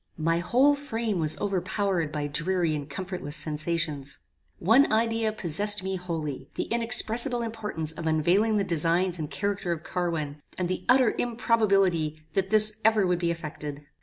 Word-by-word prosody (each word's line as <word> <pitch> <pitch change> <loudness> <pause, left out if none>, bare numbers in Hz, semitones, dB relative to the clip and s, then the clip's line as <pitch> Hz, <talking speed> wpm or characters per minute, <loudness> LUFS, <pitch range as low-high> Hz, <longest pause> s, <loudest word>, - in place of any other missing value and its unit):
My 165 +1 +1
whole 255 +11 +3
frame 230 -8 -2
was 155 -1 0
overpowered 190 -3 -1
by 150 -1 -3
dreary 165 +3 0
and 145 -1 -5
comfortless 180 -1 -5
sensations. 155 -2 -1 0.4
One 230 +10 +4
idea 225 0 +1
possessed 205 +1 +2
me 190 0 -2
wholly; 155 -7 -5
the - - -1
inexpressible 235 +1 +2
importance 210 -9 -3
of 160 0 -6
unveiling 180 +8 +2
the 200 - +2
designs 175 +1 +1
and 150 -2 -4
character 200 -3 -2
of 165 -2 -3
Carwin, 160 -5 -3 0.2
and 180 -1 -2
the 185 - -3
utter 250 -2 +5
improbability 195 -10 +1
that 190 -1 0
this 215 0 +4
ever 220 -2 +4
would 180 -1 +1
be 170 -1 0
effected. 150 -3 -5
180 Hz, 155 wpm, -27 LUFS, 155-215 Hz, 0.4 s, utter